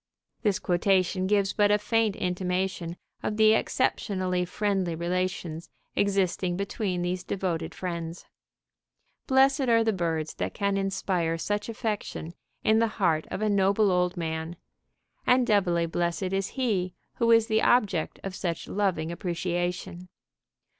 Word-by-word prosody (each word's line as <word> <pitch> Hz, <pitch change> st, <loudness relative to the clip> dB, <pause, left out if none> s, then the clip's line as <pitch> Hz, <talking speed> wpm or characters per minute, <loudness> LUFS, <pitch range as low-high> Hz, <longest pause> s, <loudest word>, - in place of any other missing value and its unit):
This 205 Hz, -4 st, +2 dB
quotation 185 Hz, -1 st, +1 dB
gives 200 Hz, -1 st, +2 dB
but 205 Hz, -1 st, +3 dB
a 210 Hz, -, +5 dB
faint 215 Hz, 0 st, +1 dB
intimation 180 Hz, -2 st, -2 dB, 0.2 s
of 210 Hz, -, -2 dB
the 220 Hz, 0 st, +6 dB
exceptionally 185 Hz, -7 st, 0 dB
friendly 190 Hz, -2 st, -1 dB
relations 175 Hz, -1 st, -2 dB, 0.3 s
existing 190 Hz, -3 st, +1 dB
between 200 Hz, -2 st, -2 dB
these 180 Hz, +1 st, -2 dB
devoted 180 Hz, -4 st, -3 dB
friends. 170 Hz, -2 st, -5 dB, 1.0 s
Blessed 270 Hz, 0 st, +4 dB
are 230 Hz, -1 st, +5 dB
the 220 Hz, -1 st, +1 dB
birds 165 Hz, -4 st, -1 dB
that -, -, -4 dB
can 200 Hz, -1 st, 0 dB
inspire 190 Hz, -4 st, 0 dB
such 205 Hz, +7 st, -2 dB
affection 215 Hz, -7 st, -4 dB, 0.3 s
in 220 Hz, +1 st, +4 dB
the 230 Hz, -, +3 dB
heart 165 Hz, -6 st, +1 dB
of 215 Hz, -, -3 dB
a -, -, +2 dB
noble 200 Hz, +1 st, +3 dB
old 180 Hz, 0 st, +1 dB
man, 160 Hz, 0 st, -3 dB, 0.7 s
and 250 Hz, 0 st, +5 dB
doubly 185 Hz, -6 st, +2 dB
blessed 175 Hz, +3 st, -1 dB
is 195 Hz, 0 st, 0 dB
he 200 Hz, -8 st, 0 dB, 0.2 s
who 235 Hz, -2 st, +2 dB
is 230 Hz, -1 st, +6 dB
the 220 Hz, -1 st, +2 dB
object 205 Hz, -9 st, +2 dB
of 195 Hz, -, -4 dB
such 175 Hz, -3 st, -3 dB
loving 190 Hz, -5 st, 0 dB
appreciation. 175 Hz, 0 st, -3 dB
185 Hz, 135 wpm, -27 LUFS, 175-210 Hz, 1.0 s, the